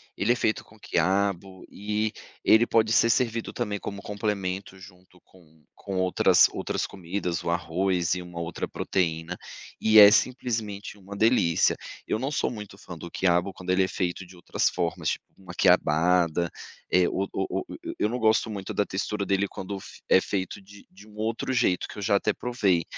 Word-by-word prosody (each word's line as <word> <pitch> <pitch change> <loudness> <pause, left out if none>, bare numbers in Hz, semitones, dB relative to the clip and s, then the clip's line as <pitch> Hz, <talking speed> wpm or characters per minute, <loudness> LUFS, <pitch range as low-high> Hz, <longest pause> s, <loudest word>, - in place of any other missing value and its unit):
Ele 110 +5 +2
é - - -3
feito 110 -3 -1
com 110 - -19
quiabo 95 0 -1
e 105 +1 -2 0.3
ele 110 +2 +5
pode 110 -1 +2
ser 115 +1 +4
servido 115 0 0
também 105 -4 -2
como 100 0 -6
complemento 100 -2 -3
junto 90 -1 -16
com 80 -4 -23
com 100 - -7
outras 95 -1 +4
outras - - -2
comidas, 90 -1 -4
o - - -3
arroz 90 +1 0
e 90 - -4
uma 90 -1 -8
outra 85 +1 -4
proteína, 85 -1 -2 0.4
e 110 0 +4
é 105 -1 +11
simplesmente 110 -4 -1
uma 100 0 -10
delícia. 105 -6 +3 0.3
Eu - - -1
não 135 +4 -2
sou - - 0
muito 105 -4 -9
fã 90 -3 -10
do 85 - -8
quiabo, 90 +1 +1
quando 90 0 -10
ele 95 +1 +4
é 95 - 0
feito 90 0 -3
de 90 - -15
outras 85 - 0
formas 85 -2 -2
tipo: - - -3
uma 95 -2 -11
quiabada, 85 +1 +3 0.4
e 90 -1 +4
o 95 - -1
o 95 - -2
o - - -10 0.3
eu 105 - +1
não 125 +2 -3
gosto 110 0 +3
muito 100 -3 -5
da 105 - +1
textura 100 +2 -3
dele 100 +1 +1
quando 100 +1 -6 0.3
é - - +7
é - - +2
feito 95 0 -3
de 100 +1 -16
de 100 +3 -16
um 105 - -17
outro 110 +4 -2
jeito 90 -7 +1
que - - -11
eu - - -5
já 100 0 +3
até 105 +1 0
provei, 100 -9 +1
95 Hz, 190 wpm, -26 LUFS, 90-105 Hz, 0.4 s, é